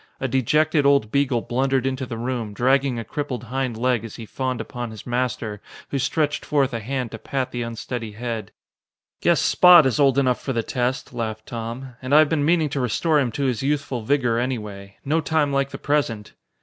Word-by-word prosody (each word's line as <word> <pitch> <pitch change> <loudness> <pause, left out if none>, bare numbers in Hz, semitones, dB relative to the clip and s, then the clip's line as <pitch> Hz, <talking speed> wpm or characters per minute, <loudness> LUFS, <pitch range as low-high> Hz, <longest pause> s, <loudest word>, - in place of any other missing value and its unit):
A 135 - -1
dejected 150 +4 +2
old 140 -6 +3
beagle 140 -4 +1
blundered 130 +2 0
into 130 0 -2
the 115 - -5
room, 115 -3 -3
dragging 130 +1 +2
a 115 - -3
crippled 130 0 -4
hind 125 -1 -3
leg 125 -1 +1
as 115 - -8
he 115 - -8
fawned 130 +2 -3
upon 120 +1 -5
his 110 -2 -10
master, 120 -4 -2 0.3
who 140 - -1
stretched 150 +2 0
forth 140 -3 +1
a 115 - -2
hand 125 +1 -3
to 110 - -7
pat 130 +1 -3
the 120 - -3
unsteady 115 -1 -5
head. 115 0 -5 0.7
"Guess - - +3
Spot 175 -4 +7
is 130 +2 +1
old 135 -2 +4
enough 130 -3 +2
for 135 - -3
the 115 -1 0
test," 125 +3 -2
laughed 110 -2 -4
Tom, 120 +3 -6
"and 130 +2 +1
I - - +9
have 155 -1 +6
been 155 -3 +1
meaning 160 0 +2
to 140 - -3
restore 140 +6 +1
him 130 -4 0
to 140 - -2
his 125 -5 0
youthful 140 -3 -1
vigor, 120 -1 +1
anyway. 105 -6 -4
No 155 +4 +1
time 150 -1 +1
like 140 0 +1
the 135 - -7
present." 130 -9 -1
130 Hz, 205 wpm, -23 LUFS, 115-140 Hz, 0.7 s, I